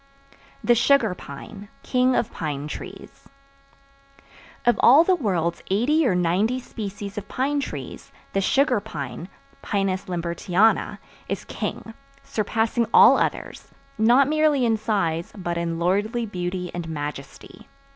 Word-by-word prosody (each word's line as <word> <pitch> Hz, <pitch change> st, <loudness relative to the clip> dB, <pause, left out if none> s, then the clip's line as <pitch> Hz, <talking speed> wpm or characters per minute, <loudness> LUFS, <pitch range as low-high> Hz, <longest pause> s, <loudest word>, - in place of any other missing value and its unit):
The 240 Hz, -, +5 dB
Sugar 235 Hz, -3 st, +3 dB
Pine, 200 Hz, +7 st, -10 dB
King 255 Hz, 0 st, +2 dB
Of 225 Hz, -, 0 dB
Pine 150 Hz, -2 st, -4 dB
Trees -, -, -10 dB, 1.4 s
Of 240 Hz, -, +3 dB
all 280 Hz, +7 st, +7 dB
the 370 Hz, -, +3 dB
world's 180 Hz, -, -1 dB
eighty 265 Hz, +10 st, +2 dB
or 185 Hz, -, +2 dB
ninety 185 Hz, +8 st, +1 dB
species 205 Hz, -4 st, -6 dB
of 205 Hz, -, -13 dB
pine 285 Hz, +3 st, -1 dB
trees, 280 Hz, -, -7 dB, 0.2 s
the 195 Hz, -, +1 dB
Sugar 260 Hz, +3 st, +2 dB
Pine 165 Hz, -3 st, -7 dB, 0.3 s
(Pinus 195 Hz, -2 st, -1 dB
Lambertiana) 175 Hz, +4 st, +1 dB, 0.3 s
is -, -, -3 dB
king, 225 Hz, -, -5 dB, 0.3 s
surpassing 225 Hz, +2 st, -1 dB
all -, -, +7 dB
others, -, -, -3 dB, 0.3 s
not 245 Hz, +5 st, +5 dB
merely 305 Hz, -3 st, +2 dB
in 225 Hz, -1 st, +2 dB
size 195 Hz, -7 st, -1 dB
but 175 Hz, -3 st, -3 dB
in 170 Hz, -1 st, -2 dB
lordly 205 Hz, +7 st, 0 dB
beauty 180 Hz, -2 st, -4 dB
and 175 Hz, -2 st, -5 dB
majesty. 145 Hz, -3 st, -7 dB
205 Hz, 125 wpm, -23 LUFS, 175-240 Hz, 1.4 s, all